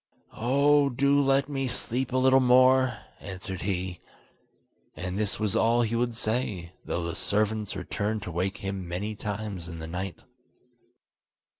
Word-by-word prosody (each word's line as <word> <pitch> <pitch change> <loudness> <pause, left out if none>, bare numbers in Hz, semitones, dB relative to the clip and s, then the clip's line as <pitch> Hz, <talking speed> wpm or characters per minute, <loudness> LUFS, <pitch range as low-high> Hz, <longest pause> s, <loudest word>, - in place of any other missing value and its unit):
"Oh, 140 +4 +3
do 140 +3 +3
let 135 0 +3
me 135 -2 -2
sleep 125 +1 -2
a 130 - +1
little 130 +1 +5
more, 130 -1 +5 0.2
answered 95 -1 -6
he. 90 -2 -2 1.0
And 90 0 -4
this 105 -1 -1
was 105 -3 0
all 120 +1 +3
he 115 0 -1
would 120 0 0
say, 110 -7 -2
though 85 - -2
the 85 0 -3
servants 105 0 0
returned 105 +3 -2
to 90 - -5
wake 95 +4 -1
him 95 -2 -4
many 95 +5 -3
times 105 -4 -5
in 85 - -7
the 80 - -6
night. 90 +3 -5
110 Hz, 150 wpm, -27 LUFS, 95-130 Hz, 1.0 s, little